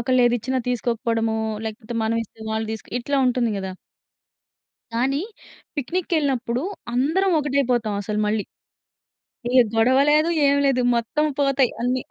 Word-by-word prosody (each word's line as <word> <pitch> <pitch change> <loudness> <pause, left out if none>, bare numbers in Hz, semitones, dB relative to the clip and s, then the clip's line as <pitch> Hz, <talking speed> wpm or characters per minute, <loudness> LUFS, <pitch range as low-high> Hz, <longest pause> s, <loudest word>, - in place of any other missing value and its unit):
ఒకళ్ళేది 245 0 +3
ఇచ్చిన 260 +4 -2
తీసుకోకపోవడము, 230 -2 0 0.3
లేకపోతే 220 +2 -6
మనం 225 +1 0
ఇస్తే 220 - -23
వాళ్ళు 220 0 -1
తీసుక్ 220 - -8
ఇట్లా 280 +4 -1
ఉంటుంది 245 -2 +1
గదా! 190 -1 -4 1.2
కానీ, 270 +4 +1 0.6
పిక్నికెళ్ళినప్పుడు 285 -5 -1 0.3
అందరం 330 +10 +2
ఒకటైపోతాం 255 -7 0
అసలు 210 +1 -3
మళ్ళీ. 210 -1 0 1.1
ఏ - - -2 0.2
గొడవ 250 +4 +4
లేదు, 305 +3 +4 0.2
ఏమి 280 0 +3
లేదు 265 -2 +3
మొత్తం 235 +6 0
పోతాయి 275 -3 +3
అన్ని. 250 +1 0
250 Hz, 125 wpm, -23 LUFS, 225-275 Hz, 1.2 s, గొడవ